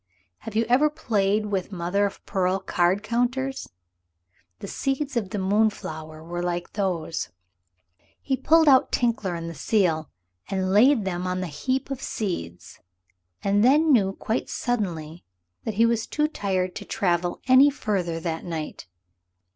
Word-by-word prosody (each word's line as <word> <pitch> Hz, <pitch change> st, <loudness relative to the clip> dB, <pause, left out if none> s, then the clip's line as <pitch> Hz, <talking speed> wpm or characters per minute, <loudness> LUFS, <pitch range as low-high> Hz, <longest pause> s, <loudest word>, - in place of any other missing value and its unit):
Have 225 Hz, -, -8 dB
you 225 Hz, +1 st, +2 dB
ever 265 Hz, +6 st, +4 dB
played 210 Hz, -6 st, 0 dB
with 200 Hz, -2 st, -2 dB
mother 190 Hz, +3 st, 0 dB
of 200 Hz, -, -11 dB
pearl 185 Hz, 0 st, +1 dB
card 185 Hz, +1 st, +1 dB
counters? 255 Hz, +4 st, -1 dB, 0.9 s
The -, -, -8 dB
seeds 275 Hz, +5 st, -2 dB
of 215 Hz, -5 st, -1 dB
the 210 Hz, -, -4 dB
moonflower 190 Hz, -6 st, -1 dB
were 175 Hz, +1 st, -4 dB
like 175 Hz, 0 st, -3 dB
those. 180 Hz, -5 st, -2 dB, 0.9 s
He 270 Hz, -, -1 dB
pulled 320 Hz, +4 st, +4 dB
out 265 Hz, -2 st, +5 dB
Tinkler 230 Hz, -7 st, 0 dB
and 165 Hz, 0 st, -5 dB
the 165 Hz, -, -5 dB
seal 160 Hz, -1 st, +1 dB, 0.4 s
and 190 Hz, -1 st, -1 dB
laid 225 Hz, +2 st, +5 dB
them 180 Hz, -1 st, -2 dB
on 180 Hz, 0 st, -1 dB
the -, -, -2 dB
heap 255 Hz, -, -2 dB
of 270 Hz, -1 st, -4 dB
seeds. 90 Hz, -, -5 dB, 0.6 s
And 200 Hz, +1 st, +3 dB
then 295 Hz, +5 st, +5 dB
knew 195 Hz, -5 st, +3 dB
quite 220 Hz, +4 st, -3 dB
suddenly 175 Hz, -9 st, -3 dB, 0.4 s
that 220 Hz, -, -3 dB
he 230 Hz, +3 st, +4 dB
was 230 Hz, -1 st, 0 dB
too 300 Hz, 0 st, +1 dB
tired 185 Hz, -9 st, -2 dB
to -, -, -7 dB
travel 175 Hz, -2 st, 0 dB
any 260 Hz, +3 st, +7 dB
further 190 Hz, -, -2 dB
that 165 Hz, -1 st, -3 dB
night. 160 Hz, -, -5 dB
200 Hz, 150 wpm, -25 LUFS, 175-240 Hz, 0.9 s, any